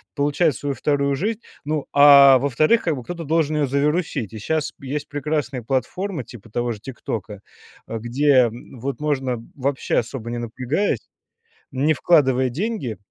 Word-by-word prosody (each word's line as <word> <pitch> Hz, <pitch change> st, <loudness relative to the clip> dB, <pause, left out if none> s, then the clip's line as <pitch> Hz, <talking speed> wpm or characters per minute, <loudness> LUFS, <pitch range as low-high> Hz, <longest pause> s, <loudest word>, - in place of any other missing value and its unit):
получает 145 Hz, +1 st, +1 dB
свою 140 Hz, +3 st, -3 dB
вторую 140 Hz, -1 st, 0 dB
жизнь. 210 Hz, -, -2 dB, 0.2 s
Ну, 150 Hz, -1 st, -2 dB
а 140 Hz, -2 st, +8 dB
во-вторых, 150 Hz, -, +2 dB
как 165 Hz, -3 st, 0 dB
бы 125 Hz, -, -7 dB
кто-то 170 Hz, +3 st, -6 dB
должен 155 Hz, 0 st, +1 dB
ее 145 Hz, -2 st, +1 dB
завирусить. 140 Hz, -, -1 dB
И 110 Hz, -, -7 dB
щас 160 Hz, +7 st, -2 dB
есть 145 Hz, +2 st, -4 dB
прекрасные 145 Hz, -3 st, -2 dB
платформы 155 Hz, -, -2 dB
типа 115 Hz, -2 st, -13 dB
того 120 Hz, +2 st, -1 dB
же 110 Hz, -, -6 dB
"Тиктока", 105 Hz, -5 st, -6 dB, 0.5 s
а, 115 Hz, -, -4 dB
где 130 Hz, +2 st, +3 dB, 0.2 s
вот 135 Hz, +4 st, -5 dB
можно, 135 Hz, -4 st, -1 dB, 0.2 s
вообще 140 Hz, 0 st, -1 dB
особо 120 Hz, 0 st, -3 dB
не 120 Hz, -, -3 dB
напрягаясь, 130 Hz, -, -1 dB, 0.7 s
не 140 Hz, +4 st, +2 dB
вкладывая 130 Hz, -5 st, +3 dB
деньги, 165 Hz, -, -3 dB
140 Hz, 150 wpm, -22 LUFS, 125-155 Hz, 0.7 s, а